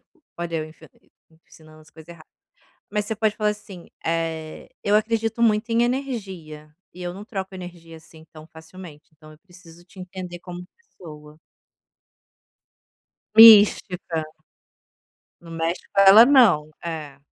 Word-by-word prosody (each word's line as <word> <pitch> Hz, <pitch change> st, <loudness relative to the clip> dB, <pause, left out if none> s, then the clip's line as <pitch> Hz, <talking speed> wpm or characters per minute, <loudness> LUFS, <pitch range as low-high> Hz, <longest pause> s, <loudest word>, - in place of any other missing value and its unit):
tip -, -, -44 dB, 0.4 s
olha 170 Hz, -1 st, -4 dB
eu 155 Hz, -, -3 dB
enfian 155 Hz, -, -18 dB, 0.6 s
ensinando 155 Hz, -1 st, -18 dB
as 155 Hz, -, -21 dB
coisa 160 Hz, +1 st, -16 dB
errada. 165 Hz, -2 st, -15 dB, 0.6 s
Mas 210 Hz, -1 st, -3 dB
você 220 Hz, -, -4 dB
pode 215 Hz, 0 st, -1 dB
falar 210 Hz, -1 st, 0 dB
assim: 200 Hz, -4 st, -12 dB, 0.2 s
"Eh, 165 Hz, -1 st, -4 dB
eu 205 Hz, -, +1 dB
acredito 225 Hz, +1 st, -1 dB
muito 220 Hz, 0 st, +1 dB
em 230 Hz, +1 st, +2 dB
energia, 190 Hz, -, -6 dB, 0.2 s
e 180 Hz, -, -12 dB
eu 175 Hz, 0 st, -5 dB
não 195 Hz, +3 st, -10 dB
troco 195 Hz, -3 st, -7 dB
energia, 175 Hz, -3 st, -11 dB
assim, 160 Hz, 0 st, -18 dB
tão 155 Hz, -1 st, -13 dB
facilmente, 160 Hz, -1 st, -14 dB
então 155 Hz, 0 st, -17 dB
eu 155 Hz, -, -19 dB
preciso 175 Hz, -2 st, -18 dB
te 185 Hz, -, -17 dB
entender 180 Hz, -1 st, -9 dB
como 180 Hz, 0 st, -10 dB
pessoa". 155 Hz, -, -15 dB, 2.0 s
Mística. 205 Hz, -7 st, +6 dB, 1.2 s
Não 170 Hz, -, -15 dB
mexe 165 Hz, +1 st, -3 dB
com 195 Hz, -, +3 dB
ela 200 Hz, +4 st, +8 dB
não. 220 Hz, -, +4 dB
É. 155 Hz, -5 st, -7 dB
175 Hz, 140 wpm, -22 LUFS, 160-210 Hz, 2.0 s, ela